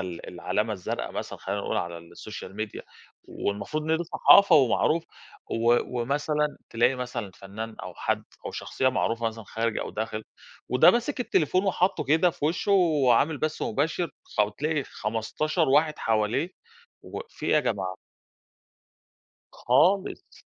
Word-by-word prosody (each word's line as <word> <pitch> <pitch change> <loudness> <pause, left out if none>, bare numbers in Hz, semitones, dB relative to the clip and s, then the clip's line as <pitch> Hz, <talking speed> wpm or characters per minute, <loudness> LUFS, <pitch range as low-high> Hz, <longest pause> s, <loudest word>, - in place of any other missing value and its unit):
ال 90 -2 -6
العلامة 110 +1 -2
الزرقا 95 -4 -4
مثلًا - - -6
خلّينا - - -3
نقول - - -2
على 85 -1 -3
السوشيال 90 +3 -10
ميديا 110 -1 -5 0.5
والمفروض 105 +10 -3
إن 160 - +4
دي 170 - -3
صحافة 200 +3 +6
ومعروف 150 +5 +3 0.5
و 120 +1 +3 0.2
ومثلًا 150 +4 -1
تلاقي 120 +3 +3
مثلًا 125 -5 -4
فنان 110 +4 -7
أو - - -7
حد - - -1 0.2
أو - - -3
شخصية 130 - -1
معروفة 115 -2 0
مثلًا 115 -1 -5
خارج 115 +2 -2
أو - - -4
داخل، 110 0 -4 0.4
وده 125 - +7
ماسك 240 +3 -1
التليفون 185 - +1
وحاطّه 185 -4 +1
كده 160 +6 +4
في 145 - -6
وشُّه 170 +6 +1
وعامل 150 -5 +3
بث 155 0 -2
مباشر 155 +7 -1 0.3
فبتلاقي 140 +9 0
15 125 - -1
واحد 150 +2 +3
حواليه 110 +9 0 0.5
واقف 475 - -8
في - - -6
إيه - - +2
يا 150 - +5
جماعة؟ 95 -7 -2 1.6
خالص، 185 +11 +1
130 Hz, 140 wpm, -26 LUFS, 110-160 Hz, 1.6 s, وده